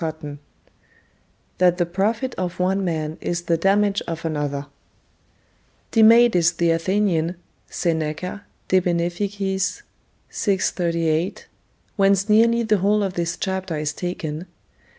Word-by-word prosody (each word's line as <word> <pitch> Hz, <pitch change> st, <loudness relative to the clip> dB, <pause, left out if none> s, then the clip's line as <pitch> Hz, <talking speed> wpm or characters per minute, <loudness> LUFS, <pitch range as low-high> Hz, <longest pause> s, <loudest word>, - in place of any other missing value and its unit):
CHAPTER 160 Hz, -2 st, -4 dB
XXI 145 Hz, 0 st, -7 dB, 1.2 s
THAT 180 Hz, -1 st, +4 dB
THE 175 Hz, -, +1 dB
PROFIT 215 Hz, +8 st, -1 dB
OF 180 Hz, -1 st, -4 dB
ONE 190 Hz, +2 st, +1 dB
MAN 160 Hz, -2 st, -3 dB
IS 170 Hz, 0 st, -2 dB
THE 170 Hz, -, +1 dB
DAMAGE 200 Hz, +3 st, +2 dB
OF 165 Hz, 0 st, -5 dB
ANOTHER 145 Hz, -3 st, -2 dB, 1.3 s
Demades 225 Hz, -6 st, +5 dB
the 170 Hz, -1 st, +2 dB
Athenian 175 Hz, -1 st, 0 dB, 0.3 s
[Seneca, 165 Hz, +4 st, -2 dB, 0.3 s
De 185 Hz, -, +4 dB
Beneficiis, 190 Hz, +3 st, -1 dB, 0.5 s
vi. 200 Hz, -3 st, 0 dB
38, 170 Hz, -2 st, -1 dB, 0.5 s
whence 195 Hz, 0 st, +3 dB
nearly 230 Hz, +2 st, +4 dB
the 215 Hz, -2 st, +2 dB
whole 205 Hz, +2 st, +2 dB
of 190 Hz, -2 st, -2 dB
this 170 Hz, -1 st, -2 dB
chapter 190 Hz, -3 st, -3 dB
is 150 Hz, 0 st, -2 dB
taken. 170 Hz, -1 st, -5 dB
180 Hz, 120 wpm, -22 LUFS, 165-200 Hz, 1.3 s, Demades